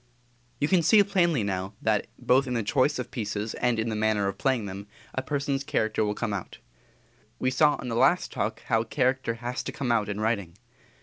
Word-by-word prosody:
You 145 - +2
can 180 +1 +4
see 205 +6 +6
plainly, 175 - +2
now, 95 0 -3
that 110 -2 +1
both 130 +2 +3
in 125 - -2
the 115 - 0
choice 135 +7 +2
of 125 - -5
pieces 105 -1 -3
and 125 -2 0
in 110 +1 -1
the 110 - -2
manner 105 -2 +1
of 100 0 -4
playing 130 -5 +1
them, 100 +1 -7 0.3
a 130 - -1
person's 140 0 -2
character 110 -4 0
will 105 0 -1
come 110 -2 -2
out. 100 - -5 0.8
We 130 - 0
saw 150 +3 +4
in 125 - -7
the 115 - -2
last - - +3
Talk - - -3
how 115 0 +1
character 130 0 0
has 120 +2 -4
to - - -5
come 135 -4 -2
out 110 -3 +1
in 100 0 -3
writing. 100 -6 -1
115 Hz, 210 wpm, -27 LUFS, 105-135 Hz, 0.8 s, see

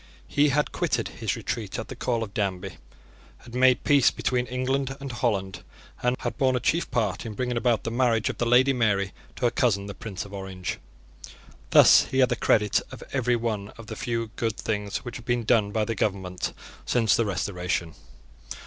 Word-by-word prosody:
He 145 +1 +3
had 150 +2 +1
quitted - - -1
his - - -3
retreat - - -4
at - - -5
the - - -7
call 120 -2 -1
of 100 -3 -8
Danby, 95 -3 -2 0.6
had 120 - -15
made 130 0 +4
peace 140 -3 +5
between 125 -1 -1
England 135 +2 -1
and 140 -1 -6
Holland, 100 - -1 0.4
and 125 +1 +2
had - - -4
borne 130 -1 +3
a - - +1
chief 170 +7 0
part 105 -6 -1
in 110 -2 -6
bringing 125 0 -2
about 115 -2 +1
the 115 - -3
marriage 115 -2 +2
of - - -3
the 120 - +1
Lady 130 +3 +5
Mary 100 -5 +1 0.2
to 125 - -2
her 120 - +3
cousin 100 -6 +1
the 100 - -6
Prince 100 -1 -6
of 100 - -12
Orange. 95 -2 -5 0.9
Thus - - +7
he 130 - -4
had 130 -1 +5
the 120 - +1
credit 105 -2 +2
of - - -9
every 125 -2 +2
one 110 -4 -2
of 115 - -10
the - - -7
few 115 -2 -3
good 115 -2 -1
things 105 0 -3
which 120 0 -5
had 120 - -12
been 120 -1 0
done 110 -2 +3
by 110 0 0
the 115 - -2
government 95 -3 -2 0.3
since 115 -3 +2
the 115 - +2
Restoration. 90 -4 -2
115 Hz, 200 wpm, -26 LUFS, 100-125 Hz, 0.9 s, Thus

